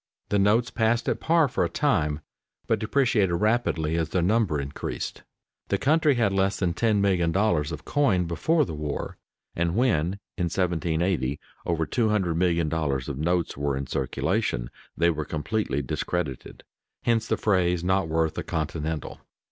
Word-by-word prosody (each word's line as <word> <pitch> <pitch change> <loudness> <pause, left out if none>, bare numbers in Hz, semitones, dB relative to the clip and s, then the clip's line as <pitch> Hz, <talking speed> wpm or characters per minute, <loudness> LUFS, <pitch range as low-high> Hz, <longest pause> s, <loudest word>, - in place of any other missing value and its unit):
The 100 - +2
notes 110 +5 +3
passed 115 +1 +1
at - - 0
par 165 -2 +3
for 125 - 0
a - - 0
time, 80 - +1 0.4
but - - +1
depreciated 110 -6 +2
rapidly 85 -6 +1
as 80 -1 0
their 90 -1 0
number 100 -5 +2
increased. 70 0 -5 0.5
The - - +1
country 155 0 +3
had 110 -5 +2
less 95 0 +1
than 90 -3 0
$10,000,000 95 -5 +2
of 80 - -7
coin 110 -12 +2
before 155 - +1
the 80 - -6
war, 75 -1 -4 0.4
and 85 +1 0
when, 95 -9 +2 0.3
in 90 - +1
1780, 85 -5 0 0.3
over 80 -1 +1
$200,000,000 85 - 0
of 70 -1 -5
notes 85 +2 0
were 70 -1 -1
in 70 - -3
circulation - - -1 0.3
they 85 +1 +4
were 80 -1 -3
completely 75 - -2
discredited; 70 +1 -4 0.4
hence 115 -1 +1
the - - +1
phrase 90 -4 +1
"not 95 -1 +1
worth 80 0 +1
a - - -3
continental." 80 0 -3
90 Hz, 150 wpm, -26 LUFS, 80-110 Hz, 0.5 s, they